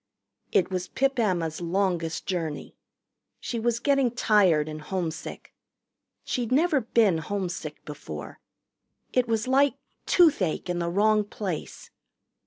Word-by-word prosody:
It 185 - +2
was 185 -1 -2
Pip 270 -1 0
Emma's 175 -7 0
longest 175 -2 -1
journey. 165 -5 -3 0.6
She 235 - -4
was 235 0 +1
getting 275 -1 +2
tired 200 -10 +3
and 155 0 -6
homesick. 160 -2 -5 0.7
She'd 245 -2 -2
never 300 +1 +3
been 220 -7 +3
homesick 175 -3 -4
before. 80 - -8 0.7
It 250 -1 +2
was 225 0 0
like 275 +1 +3 0.3
toothache 205 - +3
in 175 - -2
the 170 0 -1
wrong 210 +3 +3
place. 200 -5 -6
195 Hz, 120 wpm, -26 LUFS, 165-235 Hz, 0.7 s, tired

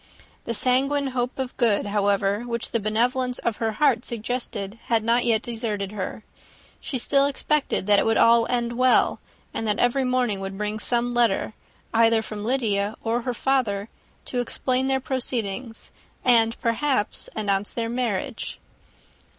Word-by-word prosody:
The 230 - -1
sanguine 270 +4 +2
hope 250 0 -2
of 260 -1 -4
good, 220 -5 +2
however, 200 -1 +1
which 235 -1 -4
the 230 - +1
benevolence 245 +4 0
of 230 -3 -2
her 225 -2 -1
heart 245 -1 +2
suggested, 230 -3 -4
had 225 -2 +1
not 235 +2 +2
yet 230 -1 +2
deserted 220 -4 -3
her; 210 +1 -5 0.6
she 270 - -4
still 275 +3 +3
expected 285 -5 0
that 205 0 +5
it - - +1
would 225 - +2
all 230 0 +5
end 240 -1 -1
well, 255 +1 +3 0.3
and 225 - -3
that 210 -1 +1
every 245 +2 +2
morning 250 -5 0
would 195 0 -5
bring 210 +1 -2
some 240 +2 +1
letter, 235 -3 +1 0.4
either 225 -1 +4
from 215 -1 -6
Lydia 215 -4 0
or 230 +2 0
her 250 +1 -2
father, 230 -6 0 0.4
to 250 - -2
explain 255 +2 -1
their 265 0 +1
proceedings, 240 -4 -4 0.3
and, 230 -2 +4
perhaps, 230 -1 0
announce 205 -2 -1
the 230 -1 -2
marriage. 235 0 -3
230 Hz, 155 wpm, -24 LUFS, 215-250 Hz, 0.6 s, that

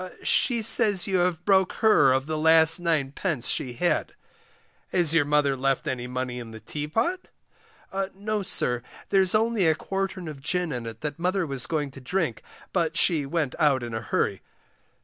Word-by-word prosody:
She 235 -3 +2
says 215 -4 +3
you 190 -1 0
have 175 -1 0
broke 190 -2 +3
her 215 - +4
of 130 +1 +1
the 155 +1 -3
last 160 +1 +5
9d. 155 -3 -1
she 125 - -2
had. 175 +9 0 0.8
Has 170 -4 +2
your 160 -3 +4
mother 145 -1 +2
left 135 0 0
any 125 -1 -3
money 125 0 -4
in 120 -2 -8
the 110 0 -10
teapot? 155 - -2 0.9
No, 210 +1 -2
sir, 125 -10 +1 0.3
there's 190 0 +3
only 220 -4 +2
a 160 - +4
quartern 195 0 -4
of 150 -3 -8
gin 180 +2 -1
in 120 -3 -4
it 115 0 -9
that 150 +1 -4
mother 180 +1 0
was 135 -6 -3
going 150 -3 -2
to 135 - -12
drink, 155 - -2 0.3
but 165 -3 0
she 155 -6 +2
went 150 -3 -1
out 140 -5 +3
in 120 -1 -6
a 110 - -3
hurry. 100 -2 -1
160 Hz, 175 wpm, -25 LUFS, 135-185 Hz, 0.9 s, last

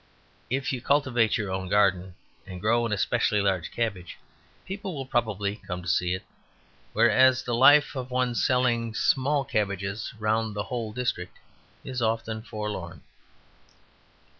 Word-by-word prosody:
If 135 +2 -1
you 125 - -3
cultivate 130 -6 +2
your 105 -4 -3
own 95 -1 -3
garden 95 -3 +2 0.3
and 90 -1 -7
grow 115 +4 +2
a 105 -2 -1
specially 110 0 +1
large 95 -4 0
cabbage, 100 -7 -3 0.5
people 190 -2 -5
will 135 -2 -5
probably 105 -5 -1
come 90 -4 -6
to - - -9
see 90 +1 +1
it. 95 - -8 0.7
Whereas 130 0 +4
the 120 - -3
life 145 +5 +6
of 130 -1 -5
one 125 -1 0
selling 120 0 +1
small 140 +3 +1
cabbages 100 -2 -2
round 110 0 0
the 105 - -2
whole 115 -3 -4
district 105 -7 -3 0.5
is 130 -2 -4
often 110 -1 -1
forlorn. 105 -6 -6
110 Hz, 140 wpm, -26 LUFS, 100-125 Hz, 0.7 s, life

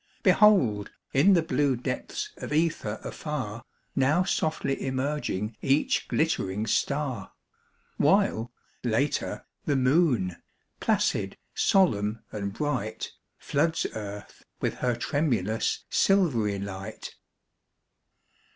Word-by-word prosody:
Behold, 135 - +5 0.2
in 150 +9 +6
the 170 -3 +4
blue 140 -2 +1
depths 130 - -4
of - - -7
ether 150 -9 0
afar, 125 -8 -4 0.3
Now 145 +7 +3
softly 155 -6 -1
emerging 130 -6 -2
each 140 +3 +2
glittering 105 -10 0
star; 140 +3 -1 0.6
While, 115 +2 +3 0.3
later, 125 +5 0 0.2
the 145 - +1
moon, 130 - +2 0.4
placid, - - +1 0.2
solemn 110 - +2
and 100 -1 -3
bright, 120 -3 -3 0.3
Floods 160 +3 0
earth 105 -1 -8 0.2
with - - 0
her 125 -1 0
tremulous, 120 - 0
silvery 130 - +3
light. 100 +2 -6
130 Hz, 95 wpm, -27 LUFS, 105-150 Hz, 0.6 s, in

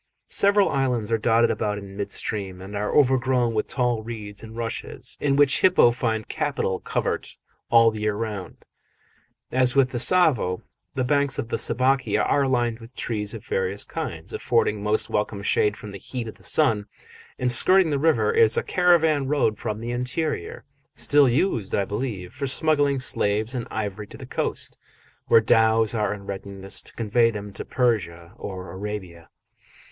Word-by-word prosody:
Several 200 0 +4
islands 125 -5 -1
are 115 - +2
dotted 115 +1 +3
about 105 -1 -2
in 100 -1 -9
mid 100 0 -4
stream 100 -3 -4
and 95 +2 -9
are 105 +1 -2
overgrown 130 -3 +2
with 110 - -1
tall 120 -3 0
reeds 105 -3 -7
and 110 0 -11
rushes, 115 -1 -4
in 140 -1 +2
which 145 -1 +4
hippo 180 -10 +5
find 115 -3 -2
capital 95 -1 -2
covert - - -3 0.3
all 115 -1 +6
the 110 - -7
year 105 -1 0
round. 105 -5 -6 0.9
As 130 0 +2
with 135 -2 +3
the 120 - -3
Tsavo, 130 - +2 0.3
the 130 - 0
banks 140 +1 +2
of 115 - -4
the - - -2
Sabaki 130 +3 +1
are 140 -1 +2
lined 120 -3 0
with 115 +2 -14
trees 105 -1 -3
of 110 - -10
various 95 +1 -2
kinds, - - -6
affording 105 -1 0
most 105 +1 +1
welcome 105 -1 -2
shade 105 +1 +1
from 105 - -9
the 100 - -9
heat 120 +1 -6
of 110 - -7
the - - -22
sun: 110 -9 +2 0.5
and 125 -1 +2
skirting 185 +7 +5
the 140 - 0
river 160 - +2
is 460 0 +4
a 470 - +1
caravan 160 -6 +3
road 130 -7 +1
from 105 - -3
the 115 +2 -5
interior 125 +6 -3 0.3
still 145 -2 +4
used, 120 - 0
I 100 - +1
believe, 105 -3 -5
for 140 +1 -4
smuggling 145 -1 +2
slaves 110 -2 0
and 125 -3 -4
ivory 105 -1 -4
to - - -12
the - - -9
coast, - - -4 0.5
where 115 - +6
dhows 110 0 +3
are 105 -3 0
in 100 -1 -7
readiness 95 0 -3
to - - -14
convey 115 +1 +2
them 105 -2 -7
to - - -6
Persia 90 -8 -1
or 95 -4 -7
Arabia. 95 -4 -7
115 Hz, 175 wpm, -24 LUFS, 105-130 Hz, 0.9 s, all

